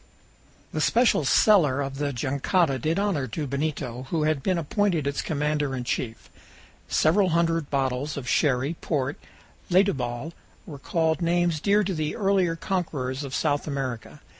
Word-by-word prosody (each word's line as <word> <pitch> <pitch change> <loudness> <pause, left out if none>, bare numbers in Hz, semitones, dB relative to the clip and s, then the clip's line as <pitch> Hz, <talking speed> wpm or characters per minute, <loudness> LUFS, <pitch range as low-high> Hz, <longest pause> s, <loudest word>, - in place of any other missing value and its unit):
The - - -1
special 235 - +3
cellar 150 -5 +4
of 135 0 -4
the 145 -1 -1
jangada 140 +3 0
did 155 +6 0
honor 195 -10 0
to 145 +6 -4
Benito, 140 -3 -3
who 160 -2 0
had 155 -2 +1
been 185 +4 0
appointed 170 -1 0
its 140 0 -1
commander 150 -2 -1
in 125 - -4
chief. 120 -2 -4 0.6
Several 185 +4 +3
hundred 165 -2 +1
bottles 135 +1 -1
of 130 -3 -6
sherry, 135 +1 +1
port, 140 -2 -2 0.5
and 175 - -1
letubal 125 -1 -3 0.3
recalled 160 +3 -1
names 170 -1 +1
dear 205 +5 +3
to 190 0 -2
the 155 -2 -2
earlier 195 -4 +1
conquerors 150 -7 -3
of 135 -2 -5
South 145 -1 0
America. 135 -1 -4
150 Hz, 150 wpm, -25 LUFS, 135-170 Hz, 0.6 s, cellar